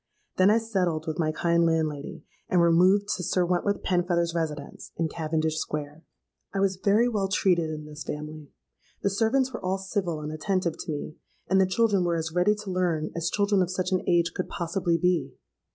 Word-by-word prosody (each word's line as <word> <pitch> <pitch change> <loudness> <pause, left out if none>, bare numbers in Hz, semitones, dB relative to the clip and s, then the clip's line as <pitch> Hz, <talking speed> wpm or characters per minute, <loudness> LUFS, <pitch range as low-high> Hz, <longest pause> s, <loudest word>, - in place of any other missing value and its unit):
Then 185 +1 +5
I 215 - +5
settled 185 -8 -1
with 160 0 -4
my 155 -2 +1
kind 170 +1 +2
landlady, 160 -3 -1 0.3
and 180 - +3
removed 180 +4 +4
to 180 - -1
Sir 180 +1 +1
Wentworth 180 +3 0
Penfeather's 175 -2 +1
residence 150 -4 -4
in 165 - +1
Cavendish 155 0 -1
Square. 150 +1 -5 0.5
"I - - +1
was 195 -1 +1
very 210 +4 +4
well 210 -5 0
treated 180 -4 +2
in 155 -1 -6
this 150 0 -8
family. 150 -1 -7 0.5
The 200 - +2
servants 250 +6 +1
were - - -6
all 185 +1 0
civil 190 -4 -2
and 150 0 -5
attentive 170 +1 -1
to - - -4
me; 150 +1 -5 0.3
and 190 0 +4
the 190 - +3
children 200 -1 +2
were 170 -1 +1
as 160 -1 -3
ready 180 +4 +3
to 210 -2 -7
learn 170 -4 0
as 170 0 -1
children 200 -1 +2
of 180 - 0
such 185 0 -2
an 185 - +2
age 170 -1 +2
could 185 - -4
possibly 170 0 -1
be. 180 0 0
175 Hz, 195 wpm, -26 LUFS, 160-195 Hz, 0.5 s, Then